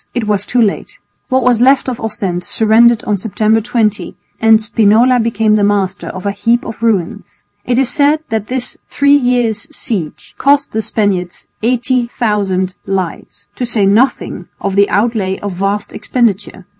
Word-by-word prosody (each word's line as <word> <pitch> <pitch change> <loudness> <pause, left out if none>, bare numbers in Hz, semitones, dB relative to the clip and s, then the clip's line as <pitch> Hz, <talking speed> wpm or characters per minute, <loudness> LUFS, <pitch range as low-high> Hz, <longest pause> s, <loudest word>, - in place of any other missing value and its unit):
It 240 -3 -1
was 205 -1 -1
too 250 - 0
late. 215 -4 -1 0.3
What 260 -1 +1
was 245 -2 +2
left 270 +2 +4
of 250 -2 -3
Ostend 190 -5 -3
surrendered 230 +3 +3
on 210 -1 -1
September 220 +2 0
20, 215 -2 -1 0.2
and 225 -1 +5
Spinola 225 +3 +3
became 225 -2 +1
the 205 - +1
master 200 -1 0
of 185 +1 -7
a 200 - 0
heap 230 +4 0
of 225 - -8
ruins. 210 -7 -2 0.2
It 245 -1 0
is 265 -1 +3
said 295 +2 +2
that 220 -2 -2
this 255 -1 -3
three 285 0 +3
years' 245 -5 0
siege 190 - -4
cost 280 0 +2
the 220 - 0
Spaniards 200 -5 -2
80,000 225 -6 -1
lives, 190 -3 -4
to - - -4
say 230 -4 +1
nothing 205 -3 +1
of 195 -1 -3
the 200 0 +3
outlay 205 -3 0
of 205 -2 -5
vast 195 +3 -2
expenditure. 205 -6 -2
220 Hz, 160 wpm, -14 LUFS, 200-245 Hz, 0.3 s, and